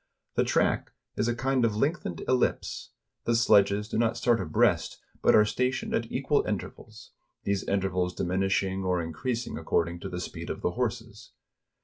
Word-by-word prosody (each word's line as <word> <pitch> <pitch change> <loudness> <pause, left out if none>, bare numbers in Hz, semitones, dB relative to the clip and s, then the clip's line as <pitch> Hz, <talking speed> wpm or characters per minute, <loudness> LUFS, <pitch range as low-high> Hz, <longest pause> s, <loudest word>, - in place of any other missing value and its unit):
The - - +2
track - - +1 0.2
is - - 0
a 120 - 0
kind 130 0 +1
of 110 -3 +2
lengthened 140 - -1
ellipse; 130 -1 0 0.4
the 120 - +2
sledges 105 -2 +4
do 110 - -2
not 115 -1 +1
start 120 -4 +2
abreast, 80 -4 +1 0.2
but - - +5
are 105 - +6
stationed 125 +4 -1
at 115 0 -1
equal 140 +2 +1
intervals; 105 -4 -6 0.3
these 100 -1 0
intervals 95 -2 0
diminishing 95 +1 0
or 90 -1 +1
increasing 115 - -3
according 85 +1 0
to - - -6
the 90 - -4
speed 90 - -6
of - - -4
the - - +1
horses. - - -4
105 Hz, 160 wpm, -28 LUFS, 95-120 Hz, 0.4 s, are